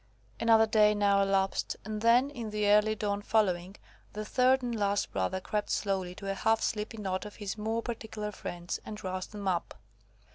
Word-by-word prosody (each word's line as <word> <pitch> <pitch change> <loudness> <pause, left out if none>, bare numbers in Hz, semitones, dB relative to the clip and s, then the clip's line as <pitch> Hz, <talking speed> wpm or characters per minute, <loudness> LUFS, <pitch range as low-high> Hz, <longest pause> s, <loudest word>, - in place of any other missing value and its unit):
Another 225 -1 +5
day 215 -1 +4
now 200 -1 +3
elapsed, 195 -1 0
and 215 0 -4
then, 245 +5 +4
in 235 -6 -5
the 210 0 0
early 210 +1 +4
dawn 205 -1 -2
following, 195 -4 +1 0.4
the 215 0 -5
third 255 +3 +3
and 240 -1 -2
last 205 -1 0
brother 95 - -1
crept 210 +2 -3
slowly 190 -3 -1
to 195 0 -4
a - - -1
half 220 +3 +2
sleepy 215 +1 -2
knot 190 -3 -2
of 210 -1 -9
his 205 -3 -4
more 220 +2 -2
particular 220 -3 -5
friends, 175 -3 -5
and 210 -1 -8
roused 185 0 -4
them 205 -2 -6
up. 180 -2 -1
210 Hz, 185 wpm, -30 LUFS, 195-220 Hz, 0.4 s, Another